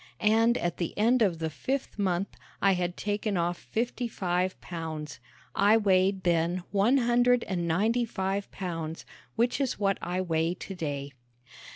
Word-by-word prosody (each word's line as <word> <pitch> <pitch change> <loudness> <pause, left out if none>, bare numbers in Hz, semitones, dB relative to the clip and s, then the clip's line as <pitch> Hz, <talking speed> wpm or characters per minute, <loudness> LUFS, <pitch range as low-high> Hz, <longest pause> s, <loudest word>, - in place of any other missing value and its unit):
And 225 +3 +4
at 175 -1 -2
the 170 - -3
end 235 +4 +3
of 190 -6 +3
the 160 -1 -3
fifth 260 - -3
month 190 -1 0 0.3
I 195 - +4
had 180 -1 -1
taken 205 -1 -1
off 175 +1 0
fifty 240 +2 -2
five 185 -3 -1
pounds. 160 -5 -6 0.3
I 205 +3 +5
weighed 190 -2 +2
then 175 +1 +1
one 210 +7 +4
hundred 245 0 +3
and 175 -3 -2
ninety 220 +9 +2
five 195 -2 -2
pounds, 165 -4 -5 0.3
which 240 +4 +1
is 270 - 0
what 195 -1 +1
I 180 +1 -2
weigh 165 -1 0
today. 145 -7 -5
190 Hz, 155 wpm, -28 LUFS, 175-220 Hz, 0.3 s, I